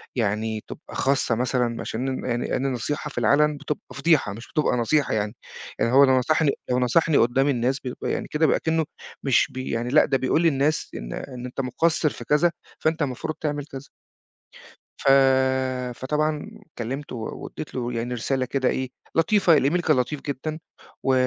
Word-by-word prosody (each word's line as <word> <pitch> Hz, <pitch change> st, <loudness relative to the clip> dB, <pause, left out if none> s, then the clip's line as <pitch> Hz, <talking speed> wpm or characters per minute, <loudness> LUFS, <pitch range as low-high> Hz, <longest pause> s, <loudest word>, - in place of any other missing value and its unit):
يعني 110 Hz, -1 st, -1 dB
تبقى -, -, -10 dB
خاصَّة 135 Hz, -3 st, +1 dB
مثلًا، 125 Hz, -1 st, 0 dB
عشان 125 Hz, +4 st, -3 dB, 0.2 s
ن -, -, -7 dB
يعني 120 Hz, -1 st, -1 dB
أنا 135 Hz, +2 st, 0 dB
النصيحة 135 Hz, +4 st, -2 dB
في -, -, -14 dB
العلَن 150 Hz, +1 st, +3 dB
بتبقى 150 Hz, +1 st, -4 dB
فضيحة 140 Hz, -7 st, +2 dB
مش 115 Hz, +4 st, -10 dB
بتبقى 150 Hz, -5 st, +2 dB
نصيحة 140 Hz, +5 st, +1 dB
يعني. 105 Hz, +1 st, -1 dB, 0.4 s
يعني 115 Hz, -, +2 dB
هو 140 Hz, +2 st, +7 dB
لو 130 Hz, -1 st, +5 dB
نصحني 155 Hz, +3 st, +2 dB, 0.2 s
لو 125 Hz, 0 st, +2 dB
نصَحني 150 Hz, +5 st, +3 dB
قُدَّام 125 Hz, +4 st, +3 dB
الناس، 130 Hz, 0 st, +1 dB
بيبقى 125 Hz, -2 st, -4 dB
يعني -, -, -2 dB
كده 155 Hz, +1 st, +1 dB
بيبقى -, -, +3 dB
كأنه 160 Hz, -1 st, 0 dB, 0.4 s
مش 135 Hz, -4 st, +3 dB
بي 130 Hz, 0 st, -5 dB
يعني 115 Hz, +1 st, -1 dB
لأ، 150 Hz, +4 st, +5 dB
ده 135 Hz, -, +1 dB
بيقول 130 Hz, +5 st, +1 dB
للناس 150 Hz, -1 st, +1 dB
إن -, -, -6 dB
إن 125 Hz, -2 st, -7 dB
أنتَ 125 Hz, +2 st, -4 dB
مُقصّر 160 Hz, +5 st, +1 dB
في -, -, -9 dB
كذا، 150 Hz, +4 st, +3 dB, 0.3 s
فأنتَ 160 Hz, +1 st, 0 dB
المفروض 145 Hz, +2 st, -2 dB
تعمل 145 Hz, -2 st, -2 dB
كذا. 135 Hz, -2 st, -10 dB, 1.1 s
ف -, -, -4 dB, 0.9 s
فطبعًا 150 Hz, -, -1 dB, 0.3 s
كلَّمته، 130 Hz, +4 st, -4 dB
و 110 Hz, -2 st, -6 dB
وإدِّيت 155 Hz, -, -8 dB
له 120 Hz, -1 st, -2 dB
يعني 120 Hz, +2 st, -2 dB
رسالة 130 Hz, +2 st, -1 dB
كده 130 Hz, 0 st, 0 dB
إيه، 130 Hz, -1 st, -2 dB, 0.3 s
لطيفة، 170 Hz, 0 st, +4 dB
الemail 145 Hz, +7 st, +2 dB
كان 155 Hz, -5 st, +3 dB
لطيف 135 Hz, +3 st, -1 dB
جدًا، 150 Hz, +3 st, -4 dB, 0.4 s
و 135 Hz, -, +2 dB
135 Hz, 180 wpm, -24 LUFS, 125-150 Hz, 1.1 s, هو